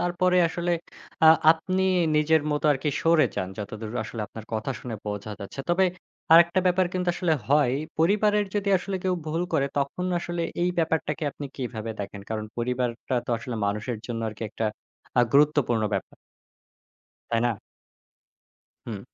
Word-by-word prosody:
তারপরে 180 +1 +2
আসলে 175 +1 -1 0.5
আ - - +10 0.2
আপনি 185 +3 -2 0.3
নিজের 150 0 +3
মতো 150 +1 -1
আরকি, 145 +2 -2
সরে 165 -1 +5
যান। 95 - -1
যতদূর 110 +1 -6
আসলে 110 +1 -6
আপনার 110 0 -10
কথা 110 +4 -2
শুনে 120 -2 -5
বোঝা 105 +1 -4
যাচ্ছে। 100 +7 -6
তবে 185 +2 +4 0.5
আরেকটা 170 +3 +7
ব্যাপার 180 0 +3
কিন্তু 180 -1 -1
আসলে 175 -2 +1 0.2
হয়। 140 -3 +4 0.2
পরিবারের 205 +4 +3
যদি 205 -1 0
আসলে 195 +1 -4
কেউ 185 -1 +2
ভুল 165 +3 -1
করে, 140 -4 +2
তখন 140 +6 -2
আসলে 175 0 -3 0.2
এই 180 - +2
ব্যাপারটাকে 160 -1 0
আপনি 145 +1 -7
কিভাবে 115 -4 -4
দেখেন? 100 0 -6
কারণ, 110 -1 -2
পরিবারটা 125 +1 -2
তো - - -3
আসলে 125 -2 -6
মানুষের 105 +3 -2
জন্য 115 -1 -3
আরকি 110 +1 -8
একটা 110 0 -2 0.5
আ - - +8
গুরুত্বপূর্ণ 145 -5 +3
ব্যাপার। - - -4 1.2
তাই 115 - +2
না? - - +2 1.4
হুম। 105 -4 -5
150 Hz, 155 wpm, -26 LUFS, 115-175 Hz, 1.4 s, আ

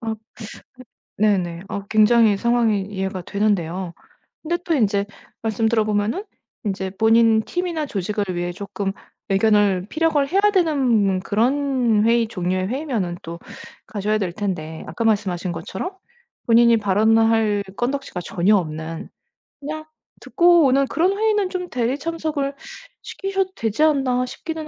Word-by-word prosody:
아 225 -2 -3 0.8
그 - - -10
네네. 180 -5 +1
아 200 - -5
굉장히 220 -1 +5
상황이 230 -2 +1
이해가 190 -1 -4
되는데요. 190 -3 -1 0.5
근데 340 +2 -1
또 335 - -1
인제 205 -7 +2 0.4
말씀 225 0 0
들어보면은 215 - 0 0.4
인제 190 -2 -2
본인 225 0 +4
팀이나 345 +1 -3
조직을 205 -2 -2
위해 175 0 -2
쪼끔 200 +1 -4 0.4
의견을 200 -2 +2
피력을 310 -2 +1
해야 385 +6 +2
되는 255 - +2
그런 240 +1 +1
회의 230 -1 +3
종류의 185 -2 -2
회의면은 235 - -2
또 170 +1 -7 0.5
가셔야 210 +1 -1
될 190 -4 -2
텐데 170 -6 -4
아까 165 +8 -5
말씀하신 200 -5 0
것처럼 190 - -5 0.6
본인이 235 0 +5
발언을 220 +2 +3
할 215 -3 +1
건덕지가 260 -6 -3
전혀 185 +6 +2
없는 160 -2 -4 0.5
그냥 310 +2 -6 0.3
듣고 345 -2 +4
오는 275 +1 +3
그런 370 +7 +1
회의는 420 -3 +1
좀 360 -1 -4
대리 245 +2 -1
참석을 305 -3 -3 0.5
시키셔도 390 -1 -2
되지 225 +6 0
않나 265 -5 +2
싶기는 315 +4 -6
220 Hz, 300 characters per minute, -21 LUFS, 195-275 Hz, 0.8 s, 굉장히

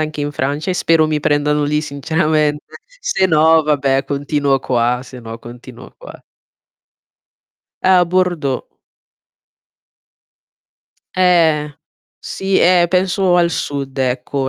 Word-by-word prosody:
anche 155 -1 -3
in 145 0 -3
Francia 145 +6 -2
e - - -1
spero 165 -3 +2
mi 155 -1 -1
prendano 150 0 +1
lì 150 +1 0
sinceramente. 150 0 -1 0.3
Se 190 - 0
no 160 -1 +4
vabbè, 140 -2 0
continuo 140 -1 -1
qua, 120 -1 0
se 125 -1 -12
no 115 0 -9
continuo 120 +1 -13
qua. - - -12 1.6
A 185 -1 +4
Bordeaux. 175 -7 -1 2.5
Eh. 165 -5 +2 0.5
Sì, 195 0 -2
eh, 175 0 +4
penso 185 0 +1
al 170 -1 +2
sud 140 -4 -4
ecco; 130 +1 -2
150 Hz, 110 wpm, -17 LUFS, 140-170 Hz, 2.5 s, no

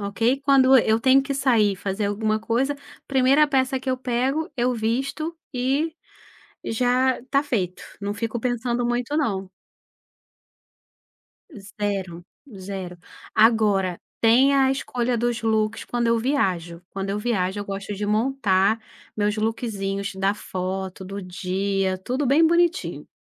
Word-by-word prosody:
ok, 225 +7 0
quando 270 -1 +6
eu 220 0 +2
tenho 265 +2 +5
que 275 - -3
sair, 230 -7 +3
fazer 200 +2 -2
alguma 215 +1 0
coisa, 250 +6 0 0.3
1ª 275 +3 +4
peça 265 -2 +1
que 260 - -2
eu 255 - 0
pego, 260 +5 -1
eu 250 0 +1
visto, 270 +9 -2 0.2
e 275 +6 0 0.7
já 250 +3 +1
está 275 +3 0
feito. 195 - -2 0.2
Não 200 0 -2
fico 230 +2 -3
pensando 240 0 -1
muito 240 +4 -1
não. 195 -10 -1 2.1
0, 195 -4 -4 0.3
0. 185 -2 -6 0.4
Agora, 210 -5 +3 0.2
tem 250 +5 +5
a 270 -1 +4
escolha 250 -2 -1
dos 240 0 -1
looks 220 -1 0
quando 240 -1 -1
eu 230 0 +3
viajo. 185 - -1
Quando 195 0 -4
eu 200 +1 -1
viajo, 205 -4 -1
eu 205 - -5
gosto 200 +1 -5
de 205 +1 -3
montar 215 -2 +2 0.4
meus 210 0 0
lookzinhos 200 -3 -2
da 195 +1 +1
foto, 190 -1 -5
do 200 +2 -6
dia, 190 +1 -1
tudo 255 +9 -2
bem 285 +6 +5
bonitinho. 340 +2 +1
225 Hz, 135 wpm, -23 LUFS, 195-260 Hz, 2.1 s, quando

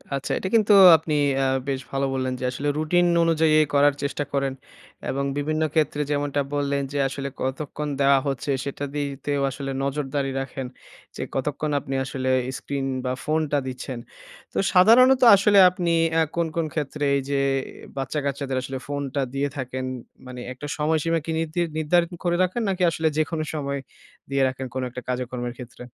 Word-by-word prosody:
আচ্ছা 135 - -4
এটা - - -3
কিন্তু 215 -2 +5 0.2
আপনি 155 0 -4 0.3
আ - - +2 0.2
বেশ 135 -1 -1
ভালো 135 0 0
বললেন 130 -1 -1
যে - - -6
আসলে 140 +3 -4
রুটিন 175 +3 +2 0.2
অনুযায়ীই 160 -2 +4
করার 145 0 +5
চেষ্টা 140 +1 -1
করেন। 135 -1 0 0.6
এবং 140 +1 -1
বিভিন্ন 155 +2 -1
ক্ষেত্রে 150 -2 +1
যেমনটা 145 0 0
বললেন 140 -1 0
যে, - - -2
আসলে 135 +1 -4
কতক্ষণ 145 +3 -3
দেওয়া 140 -1 +5
হচ্ছে 140 +1 -2
সেটা 140 0 -5
দিতেও 140 0 -2
আসলে 135 +1 -5
নজরদারি 140 0 -2
রাখেন 135 -1 -5 0.5
যে, - - -6
কতক্ষণ 150 +3 -2
আপনি 135 -1 -5
আসলে 130 -1 -3 0.3
screen 140 -1 -4 0.2
বা 125 - 0
ফোনটা 155 -1 0
দিচ্ছেন। 130 -1 -5 0.5
তো - - -5 0.2
সাধারণত 250 +8 +6
আসলে 200 +1 +3
আপনি 175 -1 -2 0.2
অ্যা 165 0 +4
কোন, 170 -1 +1
কোন 165 -1 0
ক্ষেত্রে 150 -1 -3
এই 140 - +1
যে 140 - +1 0.6
বাচ্চা-কাচ্চাদের 140 0 -2
আসলে 130 +1 -5
ফোনটা 140 -1 -2
দিয়ে 140 +1 0
থাকেন? 130 0 -4 0.4
মানে 125 0 -8
একটা 140 +3 -8
সময়সীমা 160 +2 +1
কি 165 - -3
নিরধির 165 +2 -1
নির্ধারণ 170 +3 +2
করে 175 -1 +1
রাখেন? 185 +6 -1
নাকি 185 -1 0
আসলে 160 0 0
যেকোনো 155 0 0
সময় 140 -2 -2 0.5
দিয়ে 140 0 +1
রাখেন 130 0 -4
কোন 130 - -2
একটা 125 +1 -7
কাজেকর্মের 125 -1 -3
ক্ষেত্রে? 125 0 -10
145 Hz, 165 wpm, -24 LUFS, 135-155 Hz, 0.6 s, সাধারণত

